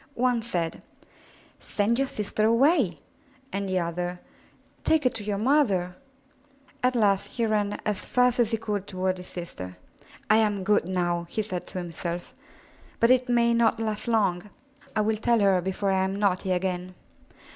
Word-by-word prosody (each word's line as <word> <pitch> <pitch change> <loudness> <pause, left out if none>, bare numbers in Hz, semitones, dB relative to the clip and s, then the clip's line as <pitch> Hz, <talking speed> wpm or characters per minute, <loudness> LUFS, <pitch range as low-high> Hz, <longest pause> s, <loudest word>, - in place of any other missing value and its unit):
One 245 -1 +2
said, 175 -8 -3 0.8
*'Send 220 +4 0
your 275 - +2
sister 215 -1 -1
away," 235 - +3 0.6
and 195 0 -2
the 185 - 0
other, 175 +1 -2 0.6
*Take 320 -2 +3
her 255 - +3
to 225 -2 -6
your 205 -1 -2
mother/* 210 -7 +2 0.9
At 250 0 +2
last 200 -4 +2
he 235 - 0
ran 210 -2 0
as 210 -3 -1
fast 250 0 +2
as 235 -3 +3
he 225 - 0
could 205 -3 -3
toward 185 -1 -1
his 180 - -9
sister. 95 - -7 0.5
"I 215 - +5
am 210 -3 +1
good 200 -3 +2
now," 175 -2 -1
he 215 - -1
said 185 -4 -5
to - - -7
himself, 175 0 -5 0.7
*'but 230 +2 +5
it 255 0 +3
may 235 -1 +3
not 230 -1 +3
last 215 0 -3
long. 205 -4 +1 0.5
I 215 - +3
will 215 +1 +1
tell 235 +1 +2
her 195 -3 +4
before 190 +2 -1
I 190 0 +2
am 190 +1 -1
naughty 195 -2 0
again." 180 0 -2
205 Hz, 165 wpm, -26 LUFS, 185-230 Hz, 0.9 s, I